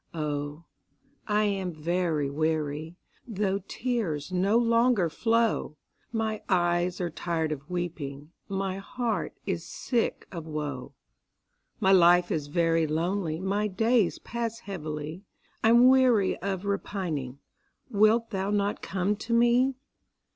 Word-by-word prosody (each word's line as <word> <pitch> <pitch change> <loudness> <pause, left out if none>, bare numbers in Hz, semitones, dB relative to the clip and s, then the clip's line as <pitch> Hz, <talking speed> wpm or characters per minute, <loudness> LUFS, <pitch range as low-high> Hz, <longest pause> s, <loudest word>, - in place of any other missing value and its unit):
Oh, 150 0 -3 0.6
I 210 0 +2
am 195 -3 -1
very 160 -2 -1
weary, 155 +2 -2 0.3
Though 200 -3 -1
tears 195 - -2
no 190 +5 +2
longer 230 -6 +3
flow; 225 -7 +1 0.3
My 220 -2 -2
eyes 175 -1 +1
are 175 -2 -2
tired 160 -1 -2
of 145 +1 -6
weeping, 155 -5 -4 0.2
My 195 -1 -2
heart 235 +3 -3
is - - -2
sick 240 -3 -2
of 165 -3 -7
woe; 150 -4 -5 0.8
My 190 - +3
life 175 -1 +6
is 150 -3 -1
very 165 +1 +2
lonely 165 +1 -1
My 200 +3 0
days 225 +1 +2
pass 230 0 -4
heavily, 155 -4 -5 0.4
I'm 235 +3 +7
weary 255 -6 +4
of 195 0 -3
repining; 175 -10 -3 0.5
Wilt 220 +3 +3
thou 195 -1 -1
not 205 0 0
come 195 +2 -1
to 235 +3 -4
me? 240 +3 +4
185 Hz, 120 wpm, -28 LUFS, 160-215 Hz, 0.8 s, I'm